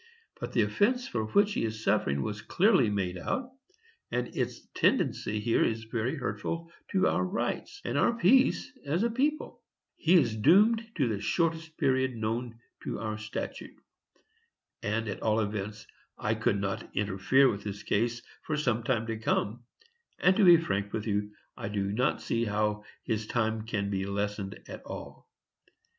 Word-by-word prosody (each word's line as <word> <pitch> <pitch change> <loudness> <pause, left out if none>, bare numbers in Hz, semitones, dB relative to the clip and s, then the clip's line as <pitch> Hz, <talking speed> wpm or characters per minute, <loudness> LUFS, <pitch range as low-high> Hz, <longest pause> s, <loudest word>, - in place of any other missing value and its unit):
But - - -5
the - - +4
offence 245 +4 +1
for 110 -2 -2
which 205 - +3
he - - -1
is 110 -1 -3
suffering 70 0 +1
was 105 +4 -4
clearly 185 - +3
made 95 -3 -2
out, 255 - -3 0.6
and 125 0 -3
its - - -3
tendency 110 - +1
here 115 +2 +2
is 110 0 0
very 115 +5 -2
hurtful 160 +7 -4 0.2
to 190 -1 +2
our - - +1
rights, 200 - -3
and - - 0
our - - +4
peace 260 +4 +4
as 160 +8 0
a 235 - +1
people. 290 +6 -1 0.4
He 170 +3 +4
is 135 -10 +4
doomed 210 - +5
to 140 -7 +2
the 105 -3 -1
shortest 165 - -1
period 130 -1 +1
known 115 +2 -3 0.3
to - - -3
our 110 -1 -4
statute. 110 0 -6 1.1
And, 110 +2 -1
at 100 - -4
all 110 0 +2
events, 105 0 -3 0.3
I 105 - 0
could 110 -2 +1
not 100 -1 -3
interfere 105 +7 +3
with 100 -4 -1
his 100 -1 -6
case 120 +3 0 0.2
for 155 - -2
some 125 -6 +1
time 115 -1 0
to 115 -1 -4
come; 115 +1 -1 0.5
and, 185 +1 +4
to 215 - +4
be 175 -2 +9
frank 100 -11 -2
with 105 -1 -2
you, 105 -1 -1 0.2
I - - -5
do 100 -1 -1
not 125 +7 0
see 115 0 0
how 105 0 -1 0.2
his 110 -1 -2
time 110 -2 -1
can 100 -3 -1
be 95 0 -1
lessened 100 0 -3
at - - -8
all. - - -9
110 Hz, 170 wpm, -29 LUFS, 105-160 Hz, 1.1 s, be